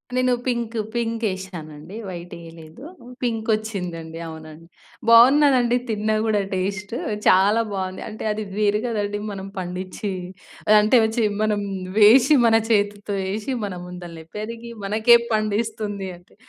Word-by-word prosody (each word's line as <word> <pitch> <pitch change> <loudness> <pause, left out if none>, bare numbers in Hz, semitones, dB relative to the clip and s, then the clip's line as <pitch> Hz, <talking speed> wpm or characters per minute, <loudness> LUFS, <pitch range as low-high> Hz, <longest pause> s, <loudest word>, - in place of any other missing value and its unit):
నేను 255 0 +2
pink 235 -2 -2 0.2
pink 230 -1 -2
ఎశానండి. 180 -2 -8
White 175 -1 -8
ఎయలేదు. 165 - -13 0.4
Pink 225 -2 -2
ఒచ్చిందండి. 175 -7 -6
అవునండి. 160 +1 -11 0.4
బావున్నదండి. 250 0 +6
తిన్నా 215 0 0
గూడా 210 -2 +2
టేస్ట్ 195 +3 -3 0.3
చాలా 200 +5 +5
బావుంది. 185 -1 -4
అంటే 215 - -8
అది 215 0 -3
వేరు 210 0 +2
గదండీ. 205 -3 -2
మనం 195 -1 -6
పండిచ్చి 185 +3 -5 0.7
అంటే 215 +4 +4 0.2
చి 230 - +3 0.2
మనం 210 -1 +1 0.4
వేసి 240 +7 +7
మన 225 -1 +5
చేతితో 205 -1 0 0.2
ఎశి 220 +5 -3
మన 195 - -5
ముందలనే 175 -2 -9
పెరిగి 230 +2 -6
మనకే 220 +4 +5 0.2
పండిస్తుంది 215 -2 -2
అంటే 175 - -24
210 Hz, 125 wpm, -22 LUFS, 185-230 Hz, 0.7 s, వేసి